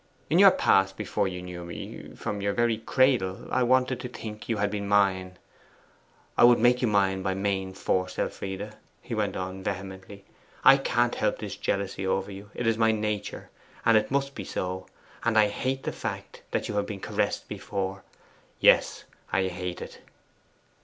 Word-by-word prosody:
In - - +5
your - - +10
past 95 0 +3
before 100 -2 -1
you 90 -1 -5
knew 90 -1 -7
me 85 0 -8
from 100 - -4
your 100 0 0
very 115 0 +1
cradle 115 -5 +1
I 130 - +2
wanted 130 +1 +2
to 125 - -5
think 110 -3 -8
you 115 - +1
had 100 0 0
been 100 -1 -3
mine. 95 -2 +2 1.0
I - - +4
would 120 0 +8
make 120 +2 +4
you 125 - +2
mine 95 -2 +2
by 95 0 -1
main 95 -1 -2
force. 95 -1 -1
Elfride,' 100 +2 -4 0.2
he - - -7
went - - -1
on 95 +1 -5
vehemently, 95 0 -6 0.4
'I 135 - +9
can't 120 -3 +1
help - - 0
this - - -6
jealousy 100 -1 -2
over 95 +1 -1
you! 100 +1 -10
It 120 - -3
is 115 0 +2
my 110 0 +5
nature, 105 -1 -3 0.3
and 110 -1 +4
must 140 0 0
be 100 - -6
so, 95 0 -4 0.4
and 115 -1 +2
I 105 -1 +6
HATE 130 +5 -2
the - - -2
fact - - -6
that - - -1
you 105 - -3
have 100 - 0
been 100 -2 -5
caressed - - -1
before: 95 -1 -4 0.6
yes - - +4 0.3
hate 90 -1 -2
it! - - -11
100 Hz, 175 wpm, -27 LUFS, 95-115 Hz, 1.0 s, your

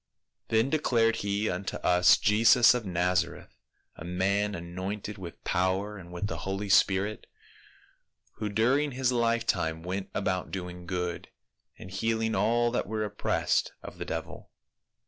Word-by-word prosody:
"Then 115 +4 +2
declared 115 -7 +2
he 100 +1 -1
unto 90 +2 -3
us 90 0 +5
Jesus 115 +4 +5
of 120 -4 -3
Nazareth, 90 0 -1 0.4
a - - -9
man 100 +4 0
anointed 95 +4 -5
with 85 -3 -9
power 95 +3 0
and 90 -1 -12
with 90 +3 -4
the 80 -5 -3
holy 95 +4 -4
spirit, 100 +2 +2 1.1
who 105 -1 -3
during 130 +7 +2
his 130 0 +1
lifetime 115 -9 0
went 95 +2 -4
about 95 -2 -1
doing 90 -2 -6
good, 90 -1 -3 0.5
and 95 - -11
heal 110 +4 -1
ing 110 0 0
all 120 +4 +2
that 125 - -1
were 110 +1 -2
oppressed 105 0 0
of - - -10
the - - -4
devil. - - -6
100 Hz, 145 wpm, -28 LUFS, 90-115 Hz, 1.1 s, us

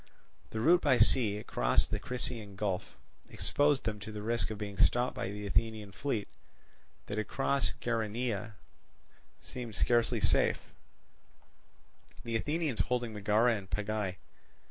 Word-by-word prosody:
The 110 - -4
route 175 +9 +5
by 125 - +4
sea, 105 -6 +4
across - - +2
the 105 - -3
Crissaean 115 -3 -4
Gulf, 100 -1 -3 0.3
exposed 145 -1 +2
them 105 -2 -2
to 105 +2 -7
the 105 -1 -6
risk 115 +1 +1
of 110 - -5
being 100 -2 -6
stopped 125 +1 +3
by - - -3
the 105 +1 -6
Athenian 105 +1 0
fleet; 110 -1 -2 0.8
that 105 - -3
across 135 +5 0
Geraneia 115 -1 -2 0.9
seemed 120 -4 -7
scarcely 120 0 +2
safe, 105 - +2 1.5
the 115 -1 -3
Athenians 150 +2 -1
holding 120 -2 0
Megara 105 +3 +3
and 100 -2 -7
Pegae. 105 -3 -2
110 Hz, 130 wpm, -32 LUFS, 105-120 Hz, 1.5 s, route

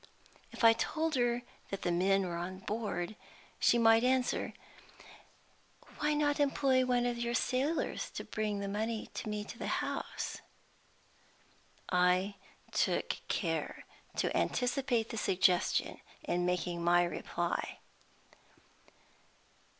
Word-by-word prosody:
If - - -7
I 225 0 +9
told 315 +7 -1
her 240 -2 +1 0.3
that 195 - -5
the 175 - +1
men 190 +2 +3
were 175 -1 -3
on 180 +2 -4
board, 210 -3 -3 0.4
she 240 - +5
might 225 0 +6
answer, 255 0 +1 1.5
"Why 300 0 +2
not 290 0 +1
employ 275 -2 +3
one 245 -1 +2
of 240 -1 -1
your 235 0 -1
sailors 270 +7 0
to - - -4
bring 210 -2 -2
the 200 - -3
money 220 +2 -2
to - - -4
me 210 0 -2
at 205 - -9
the 235 - -5
house?" - - -3 1.5
I 180 +2 +3 0.4
took - - +1
care - - -2 0.3
to - - 0
anticipate 250 -2 +1
the 225 - -5
suggestion 185 -3 +2 0.2
in 175 0 0
making 175 -1 -1
my 175 +1 +5
reply. 175 - -2
225 Hz, 120 wpm, -33 LUFS, 185-250 Hz, 1.5 s, I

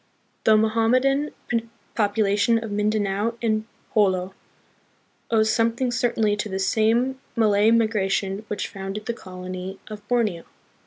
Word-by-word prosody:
The 215 -1 +6
Mohammedan 250 +6 +2 0.6
Population 210 +1 +2
of 220 - -6
Mindanao 210 +1 0
and 215 -2 0 0.3
Jolo 190 -3 +2 1.0
owes 220 -1 +3
something 230 +2 +1
certainly 225 -3 +1
to 210 0 -3
this 190 0 -1
same 235 +6 +2 0.2
Malay 215 -2 +4
migra 220 -4 +2
tion 195 0 -1
which 210 - -3
founded 195 +2 -6
the 235 - -2
colony 185 -1 -7
of 210 -1 -7
Borneo. 215 -9 0
215 Hz, 120 wpm, -24 LUFS, 195-230 Hz, 1.0 s, The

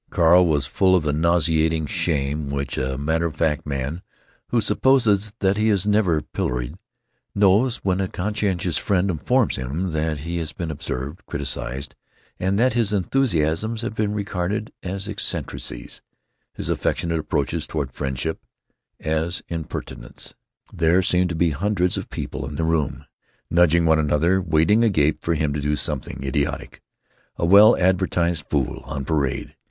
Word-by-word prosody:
Carl 90 +2 +5
was 75 -3 +1
full 95 +5 +3
of 90 - +2
the 75 -1 0
nauseating 80 0 +2
shame 75 -1 -1
which 70 -1 -3
a 65 0 -2
matter 80 +4 0
of 80 - -8
fact 75 -2 0
man, 70 +4 -3 0.5
who 120 - +1
supposes 105 -1 +3
that 95 0 +2
he 110 +1 +2
is 100 -2 +2
never 105 -7 +2
pilloried, 60 -1 -3 0.6
knows 105 +5 +4
when 95 0 +1
a 95 - 0
conscientious 95 -3 -1
friend 95 -1 +1
informs 125 - +1
him 75 +8 -3
that 80 -2 -1
he 85 +3 -4
has 80 -2 -5
been 85 -2 -4
observed, 70 +4 -5
criticized; 70 -1 -3 0.5
that 100 +7 +2
his 115 -3 +1
enthusiasms 105 - 0
have 120 -1 -3
been 110 -2 -1
regarded 105 0 -3
as 95 +2 -3
eccentricities; 110 - -3 0.5
his - - -5
affectionate 85 -1 -1
approaches 75 - -2
toward 70 -5 -3
friendship 65 +4 -3 0.6
as 80 +2 -1
impertinence. 85 -2 -6 0.4
There 85 +3 +3
seemed 90 0 +2
to 85 - -3
be 85 0 +2
hundreds 90 +3 0
of - - -5
people - - -5
in 75 - -8
the 80 - -1
room, 80 -3 -1 0.5
nudging 85 0 +4
one 80 -1 +4
another, 80 +5 +2
waiting 85 +6 +3
agape 80 -9 +2
for 85 - 0
him 75 -1 0
to 75 - -2
do 75 +1 0
something 65 -2 -3
idiotic; 70 +2 -2 0.6
a - - 0
well 100 +6 +7
advertised 90 -3 +1
fool 70 -5 -1
on 70 0 -5
parade. 70 -4 -1
85 Hz, 150 wpm, -22 LUFS, 75-95 Hz, 0.6 s, well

